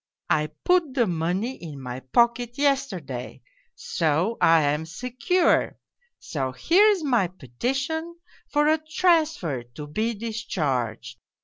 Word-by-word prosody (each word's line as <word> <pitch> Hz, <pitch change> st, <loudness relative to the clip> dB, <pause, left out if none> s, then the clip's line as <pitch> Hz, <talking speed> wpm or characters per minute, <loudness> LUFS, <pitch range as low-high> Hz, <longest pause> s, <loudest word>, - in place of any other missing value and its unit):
I 150 Hz, 0 st, +2 dB, 0.2 s
put 350 Hz, -7 st, +2 dB
the 240 Hz, -4 st, +3 dB
money 180 Hz, +8 st, -1 dB
in 150 Hz, -4 st, -7 dB
my 125 Hz, -1 st, -6 dB
pocket 235 Hz, -, +1 dB
yesterday, 220 Hz, -, -2 dB, 0.3 s
so 165 Hz, +7 st, 0 dB
I 165 Hz, -1 st, +5 dB
am 150 Hz, +2 st, 0 dB
secure 255 Hz, -, +1 dB, 0.4 s
so 135 Hz, -4 st, -4 dB
here's 385 Hz, -, +4 dB
my 240 Hz, -10 st, +2 dB
petition 270 Hz, -, -3 dB, 0.3 s
for 295 Hz, 0 st, +2 dB
a 315 Hz, +1 st, +3 dB
transfer 310 Hz, -, +1 dB
to 120 Hz, +5 st, -10 dB
be 220 Hz, +10 st, -2 dB
discharged. 155 Hz, -, -3 dB
220 Hz, 115 wpm, -25 LUFS, -, 0.4 s, I